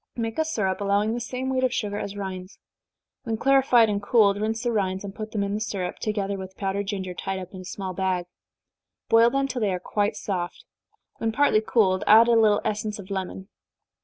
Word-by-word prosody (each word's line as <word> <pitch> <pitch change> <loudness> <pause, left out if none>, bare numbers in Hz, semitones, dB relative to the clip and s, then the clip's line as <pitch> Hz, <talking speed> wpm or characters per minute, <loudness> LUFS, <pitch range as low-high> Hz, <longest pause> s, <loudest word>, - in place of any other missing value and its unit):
Make 225 +3 -3
a 315 - +2
syrup, 205 -11 -1
allowing 205 +2 +1
the 240 - -2
same 250 +2 -4
weight 260 0 0
of 255 - +2
sugar 205 -3 -2
as 200 0 -5
rinds. 190 -1 -6 0.6
When 225 -2 -3
clarified 265 -2 +4
and 205 -1 -1
cooled, 205 -2 +3
rinse 220 +2 -1
the 240 - 0
rinds, 190 -3 -1
and 200 -1 -6
put 215 +1 -7
them 205 -2 -1
in 200 0 -2
the 210 - -1
syrup, 195 -4 -3
together 200 -2 -2
with 190 0 -9
powdered 195 0 -2
ginger, 190 -3 -3
tied 195 +2 -4
up 185 +1 -8
in 185 - -8
a - - -11
small 190 0 -5
bag. 185 -1 -1 0.8
Boil 230 +1 +6
them 275 +2 0
till 255 -2 -4
they 205 -2 +1
are 180 - -2
quite 205 +3 -1
soft 190 -4 -4 0.5
when 225 - 0
partly 235 -3 +3
cooled, 195 -4 +2
add 225 +2 +8
a - - +4
little 220 -3 +4
essence 210 0 -2
of 200 -1 -10
lemon. 190 0 -5
205 Hz, 215 wpm, -25 LUFS, 190-225 Hz, 0.8 s, add